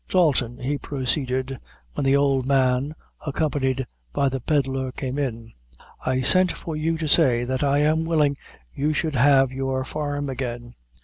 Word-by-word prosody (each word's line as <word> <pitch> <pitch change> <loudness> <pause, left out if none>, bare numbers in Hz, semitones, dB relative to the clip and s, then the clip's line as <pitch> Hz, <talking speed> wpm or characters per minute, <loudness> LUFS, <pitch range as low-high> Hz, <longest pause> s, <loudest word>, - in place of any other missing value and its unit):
"Dalton," 135 -9 +2
he 140 +2 -2
proceeded, 130 -1 -2 0.3
when - - -2
the 135 +1 +4
old 135 -2 +2
man, 135 +2 +2 0.3
accompanied 135 -3 0 0.3
by 140 - +1
the 135 0 -3
Pedlar, 135 -1 0
came 130 +1 -4
in, 115 -4 -4 0.5
"I 130 0 0
sent 185 +7 +4
for 160 - -6
you 160 +2 0
to 160 -1 -2
say 130 -6 +4
that 130 +1 -2
I 145 0 +2
am 160 +2 +2
willing 150 -4 +2 0.4
you 150 +2 0
should 155 0 -1
have 135 0 +4
your 130 0 -2
farm 145 0 -3
again." 120 -2 -5
135 Hz, 160 wpm, -24 LUFS, 130-145 Hz, 0.5 s, the